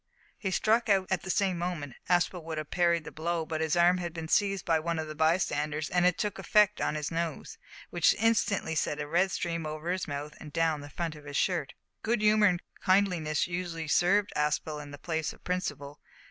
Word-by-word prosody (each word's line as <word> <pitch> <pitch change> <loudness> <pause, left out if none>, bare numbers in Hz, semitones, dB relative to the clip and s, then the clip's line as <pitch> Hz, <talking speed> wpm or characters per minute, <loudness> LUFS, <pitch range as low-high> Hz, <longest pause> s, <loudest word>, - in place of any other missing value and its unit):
He 195 - -2
struck 220 +4 +2
out 195 -2 +4
at - - +1
the 190 - -8
same 190 -2 +1
moment. 170 -6 -3 0.2
Aspel 175 0 +2
would 160 -1 -4
have 155 -1 -5
parried 170 -2 +2
the - - -8
blow, 165 +1 -2
but 160 0 -3
his 160 +1 +1
arm 175 +1 +4
had 175 -1 -5
been 165 -1 -5
seized 195 +2 +1
by 165 -1 +3
one 165 +1 -2
of 160 -1 -3
the 155 - -6
bystanders, 155 -2 0
and 180 0 +4
it 180 - +1
took 210 -2 -2
effect 210 -1 +3
on - - 0
his 150 0 -3
nose, 165 0 -4 0.3
which - - +4
instantly 215 -6 +1
sent 150 -1 -1
a 150 - -2
red 175 +6 +2
stream 170 -3 -2
over 155 +3 -4
his 185 0 -2
mouth 145 +1 -5
and 150 - -10
down 160 -1 +1
the 145 - -9
front 165 +2 -3
of 150 -1 -13
his 145 -1 -4
shirt. 170 -7 0 0.3
Good 225 -1 0
humour 210 0 +5
and 180 -2 0 0.2
kindliness 180 -6 +2
usually 170 -2 -4
served 195 +6 +3
Aspel 150 0 -1
in 145 - -10
the 145 - -9
place 160 +1 -3
of - - -20
principle. 145 -6 -3
170 Hz, 215 wpm, -29 LUFS, 155-185 Hz, 0.3 s, humour